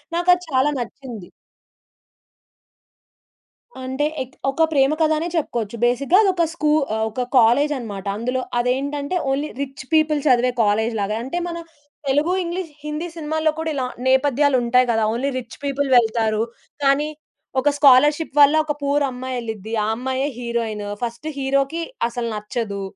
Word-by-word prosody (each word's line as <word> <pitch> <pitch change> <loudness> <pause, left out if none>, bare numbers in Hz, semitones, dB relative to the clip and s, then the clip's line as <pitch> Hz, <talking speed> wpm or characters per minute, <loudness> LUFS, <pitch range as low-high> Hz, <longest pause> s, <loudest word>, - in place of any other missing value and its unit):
నాకది 355 +1 +3
చాలా 270 +1 +2
నచ్చింది. 235 -5 -7 2.5
అంటే 265 +3 -1 0.2
ఎక్ 260 0 -7
ఒక 275 +4 +1
ప్రేమ 275 -2 +3
కథనే 315 +1 +2
చెప్పుకోవచ్చు. 235 -8 -2
బేసిక్‌గా 275 +8 +3
అదొక 370 -4 +2
స్కూ 305 -3 0 0.2
ఆహ్, 220 - 0
ఒక 250 +4 -3
కాలేజన్నమాట. 240 -4 +2
అందులో 250 +3 -1 0.2
అదేంటంటే 280 +5 -1 0.2
ఓన్లీ 285 +3 -1
రిచ్ 275 -1 -6
పీపుల్ 310 -1 +3
చదివే 250 -1 +4
కాలేజ్ 220 +2 +1
లాగా. 210 +2 -1
అంటే 270 +8 -3
మన 340 -1 -4 0.5
తెలుగు, 295 +6 +2
ఇంగ్లీష్, 345 -1 -4
హిందీ 300 +3 -3
సినిమాల్లో 315 0 0
కూడా 320 0 -2
ఇలా 260 -2 -1 0.2
నేపథ్యాలుంటాయి 260 -2 +3
గదా! 225 -1 +1
ఓన్లీ 260 +4 -1
రిచ్ 240 -2 -11
పీపుల్ 280 0 -1
వెళ్తారు. 220 -2 +2 0.4
కాని, 275 +2 +3 0.5
ఒక 290 - +3
స్కాలర్‌షిప్ 290 +2 +5
వల్ల 290 +2 +7
ఒక 300 - -1
పూర్ 285 +1 +1
అమ్మాయెళ్ళిద్ది. 235 -4 -5
ఆ - - -1
అమ్మాయే 260 +3 -2
హీరోయిను. 230 -3 -3
ఫస్ట్ 235 +4 -4
హీరోకి 275 +4 0 0.3
అసలు 235 0 -4
నచ్చదు, 210 -1 -4
265 Hz, 135 wpm, -21 LUFS, 235-295 Hz, 2.5 s, వల్ల